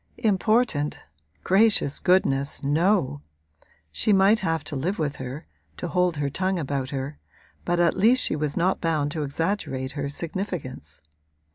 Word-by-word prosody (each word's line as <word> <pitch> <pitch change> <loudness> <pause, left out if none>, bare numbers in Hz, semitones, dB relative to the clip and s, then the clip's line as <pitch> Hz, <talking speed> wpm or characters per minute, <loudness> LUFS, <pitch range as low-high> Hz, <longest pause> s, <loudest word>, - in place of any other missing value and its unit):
Important 215 - +1 0.4
gracious 195 -7 +3
goodness, 140 -8 +2
no! 150 - +1 0.7
She 80 - +1
might 200 +3 +5
have 165 -4 -1
to 150 - -5
live 175 +10 -1
with 150 -2 -2
her, 130 +3 -7 0.3
to - - -4
hold 180 -3 +1
her 145 -1 0
tongue 190 +4 -1
about 140 -4 -2
her; 140 +2 -5 0.5
but 175 0 0
at 170 -1 +3
least 245 +5 +4
she - - 0
was 150 -1 -2
not 180 +2 +1
bound 155 -4 0
to 155 - -3
exaggerate 145 -3 -2
her 140 -1 -4
significance. 150 - -5
160 Hz, 145 wpm, -25 LUFS, 140-190 Hz, 0.7 s, might